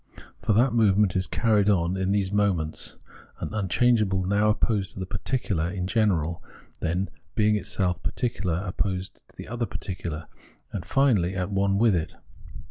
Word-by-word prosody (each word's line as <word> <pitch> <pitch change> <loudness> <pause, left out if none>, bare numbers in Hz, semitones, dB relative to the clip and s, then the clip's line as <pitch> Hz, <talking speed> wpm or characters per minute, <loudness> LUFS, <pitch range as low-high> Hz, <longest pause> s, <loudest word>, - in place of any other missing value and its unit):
For 110 - +1
that 120 +4 +3
movement 105 -4 +3
is 95 0 +1
carried 105 -3 +2
on 90 -2 +2
in 95 0 0
these 100 -2 +1
moments: 95 -7 0 0.4
an - - -5
unchangeable 105 -1 +2
now 100 +3 +2
opposed 105 -2 0
to - - -9
the 95 - -3
particular 95 - -1
in 90 -1 -3
general, 90 -6 +1 0.4
then, 90 +4 -1 0.2
being 105 -1 +3
itself 95 -3 -1
particular, 100 -8 -2
opposed 95 0 -3
to - - -24
the - - -9
other 115 +2 -2
particular, 85 -4 -5 0.5
and 95 - -4
finally 100 - +2
at 95 +1 -2
one 100 0 +2
with 110 0 +4
it. 80 -2 -3
100 Hz, 155 wpm, -26 LUFS, 90-105 Hz, 0.5 s, with